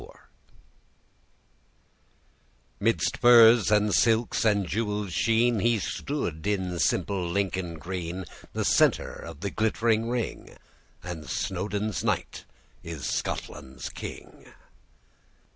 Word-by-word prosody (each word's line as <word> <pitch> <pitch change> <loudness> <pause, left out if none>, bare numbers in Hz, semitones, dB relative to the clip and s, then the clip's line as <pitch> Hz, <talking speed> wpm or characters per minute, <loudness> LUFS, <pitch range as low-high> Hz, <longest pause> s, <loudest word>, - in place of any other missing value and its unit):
'Midst 90 -6 +1
furs, 120 -2 +7
and 105 -1 +3
silks, 115 +5 +2
and 100 -3 +2
jewels' 105 -2 -2
sheen, 115 +2 +2
He 115 +3 +2
stood, 95 - -4
in 95 -4 -1
simple 90 0 0
Lincoln 95 -2 -2
green, 90 +2 -5 0.3
The - - -1
center - - +3
of 75 - -10
the 100 0 -3
glittering 110 +1 +1
ring; 120 -2 -4 0.5
And 85 -4 -7
Snowdon's 100 +2 -2
knight - - -2 0.4
is 80 -5 -7
Scotland's 65 -2 -4
king! - - -10
100 Hz, 95 wpm, -27 LUFS, 90-110 Hz, 0.5 s, furs